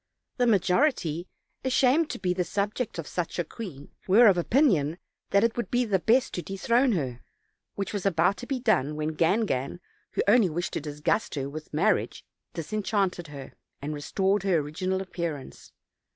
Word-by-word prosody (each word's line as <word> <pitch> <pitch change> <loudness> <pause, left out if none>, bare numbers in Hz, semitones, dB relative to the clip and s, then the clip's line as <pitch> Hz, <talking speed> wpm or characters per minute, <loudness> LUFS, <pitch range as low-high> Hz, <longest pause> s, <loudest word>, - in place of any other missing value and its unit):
The 245 -1 +2
majority, 180 - +2 0.4
ashamed 265 +4 +3
to - - -4
be 180 -2 0
the 180 0 0
subjects 205 +5 -2
of 165 - -4
such 175 +1 -3
a 175 - +1
queen, 160 - -9 0.2
were 215 +6 +7
of 200 -4 +7
opinion 175 - +2 0.3
that 200 +1 +3
it 230 0 +2
would 240 - -3
be 245 0 +1
the 200 -4 +1
best 245 +8 +2
to 175 - -2
dethrone 235 - +1
her, 130 -9 -3 0.5
which 200 +1 -3
was 205 -3 -2
about 190 +1 +2
to 245 - -8
be 270 -2 -2
done, 150 - +1
when 155 +1 -2
Gangan, 165 - 0 0.3
who - - +1
only 210 -2 +5
wished 175 +3 -3
to - - -2
disgust 150 +7 -1
her 135 -1 -2
with 155 +2 -8
marriage, - - 0 0.3
disenchanted 195 0 -1
her, 140 -3 -9 0.3
and 145 +2 -4
restored 190 +7 0
Tier 185 -3 +2
original 185 +6 -2
appearance. 170 -7 -6
185 Hz, 170 wpm, -27 LUFS, 155-220 Hz, 0.5 s, were